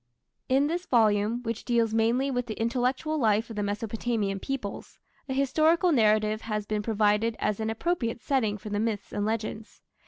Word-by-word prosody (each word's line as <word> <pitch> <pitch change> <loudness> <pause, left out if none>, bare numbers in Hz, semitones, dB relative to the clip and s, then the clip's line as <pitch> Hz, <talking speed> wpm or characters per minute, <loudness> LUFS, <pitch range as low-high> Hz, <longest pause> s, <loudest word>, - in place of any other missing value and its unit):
In 270 +2 +4
this 345 +4 -2
volume, 220 0 +2
which 230 -2 -4
deals 230 -2 +1
mainly 235 +5 +2
with 245 -1 -2
the 215 - -6
intellectual 255 +7 0
life 225 -1 +2
of - - -7
the 210 - -2
Mesopotamian 210 -1 -2
peoples, 245 -4 -5 0.3
a - - -1
historical 315 +6 +3
narrative 215 -4 +3
has 210 -2 -3
been 210 0 -1
provided 215 +1 +1
as 210 0 -1
an 220 0 -1
appropriate 235 -1 -1
setting 225 -4 0
for 210 +1 -9
the 205 - 0
myths 215 -2 -2
and 205 +1 -1
legends. 220 0 -4
225 Hz, 175 wpm, -27 LUFS, 210-250 Hz, 0.3 s, In